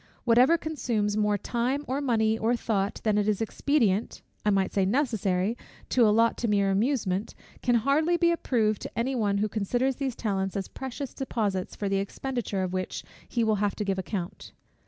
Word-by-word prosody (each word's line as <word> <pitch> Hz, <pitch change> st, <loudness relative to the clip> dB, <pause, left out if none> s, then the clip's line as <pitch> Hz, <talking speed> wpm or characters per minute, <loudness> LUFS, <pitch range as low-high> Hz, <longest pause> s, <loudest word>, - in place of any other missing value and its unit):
Whatever 250 Hz, +7 st, +5 dB
consumes 235 Hz, -10 st, -1 dB
more 210 Hz, -1 st, +2 dB
time, 250 Hz, +7 st, -1 dB
or 265 Hz, +3 st, -1 dB
money, 220 Hz, -5 st, +2 dB
or 225 Hz, +2 st, +1 dB
thought, 205 Hz, -3 st, -1 dB
than 210 Hz, -2 st, +2 dB
it 205 Hz, -, 0 dB
is 210 Hz, -2 st, +1 dB
expedient 225 Hz, -2 st, 0 dB, 0.2 s
(I 210 Hz, -, +2 dB
might 195 Hz, -2 st, +1 dB
say 195 Hz, -, +2 dB
necessary) 210 Hz, -3 st, +1 dB, 0.3 s
to 240 Hz, -3 st, +4 dB
allot 230 Hz, +2 st, +3 dB
to 235 Hz, -, 0 dB
mere 200 Hz, -2 st, +2 dB
amusement, 205 Hz, -2 st, 0 dB, 0.3 s
can 245 Hz, -1 st, +2 dB
hardly 295 Hz, +8 st, +2 dB
be 340 Hz, 0 st, +3 dB
approved 225 Hz, -, 0 dB
by -, -, -5 dB
any 260 Hz, +3 st, -1 dB
one 205 Hz, -5 st, +1 dB
who 210 Hz, +2 st, +1 dB
considers 240 Hz, +6 st, 0 dB
these 265 Hz, -4 st, -2 dB
talents 195 Hz, -3 st, -2 dB
as 195 Hz, -, -3 dB
precious 265 Hz, 0 st, -6 dB
deposits 210 Hz, -8 st, -2 dB
for 205 Hz, -, -3 dB
the 195 Hz, 0 st, +1 dB
expenditure 210 Hz, -1 st, -3 dB
of 185 Hz, 0 st, -3 dB
which 185 Hz, -1 st, -3 dB, 0.3 s
he 235 Hz, -, 0 dB
will 220 Hz, -1 st, +2 dB
have 205 Hz, -2 st, +1 dB
to 210 Hz, -, -3 dB
give 195 Hz, -1 st, -1 dB
account. 185 Hz, -2 st, -5 dB
220 Hz, 185 wpm, -27 LUFS, 200-250 Hz, 0.3 s, Whatever